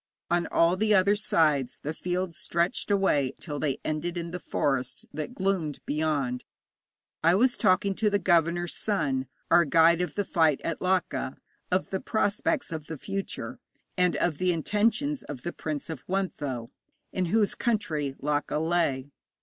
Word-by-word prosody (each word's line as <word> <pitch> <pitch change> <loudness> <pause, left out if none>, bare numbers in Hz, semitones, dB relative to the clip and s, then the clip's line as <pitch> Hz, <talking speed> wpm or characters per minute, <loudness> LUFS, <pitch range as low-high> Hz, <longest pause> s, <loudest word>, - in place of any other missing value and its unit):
On 175 0 +2
all 170 +2 +3
the 215 +1 +3
other 200 +2 +4
sides 155 - +2
the 150 - -2
fields 180 +1 -2
stretched 170 +4 -1
away 150 -10 +2
till 145 -4 -5
they 140 -4 0
ended 165 +3 -2
in 170 0 -4
the 180 - -4
forest 135 -6 -1
that 155 +12 -5
gloomed 185 -6 -1
beyond. 145 -5 -1 0.8
I 170 +2 +5
was 245 +5 +3
talking 195 +2 +3
to 210 +2 +1
the 205 - +2
governor's 175 -2 +2
son 140 -11 0 0.2
(our 175 - +7
guide 165 +2 +5
of 180 - -3
the 205 - 0
fight 160 -6 +3
at 165 - -3
Laka) 180 -8 0 0.3
of 185 +1 0
the 190 - -1
prospects 220 - 0
of 155 -2 -5
the 160 - -5
future, 195 +5 -4 0.4
and 180 -2 +2
of 155 -4 0
the 185 0 +2
intentions 225 - +1
of 140 - -8
the 175 - -3
Prince 155 -3 -4
of 160 -6 -6
Wuntho, 145 -11 -2 0.4
in 185 - 0
whose 210 +2 +2
country 160 - -1
Laka 145 +1 -1
lay. 155 -4 0
170 Hz, 160 wpm, -27 LUFS, 150-195 Hz, 0.8 s, our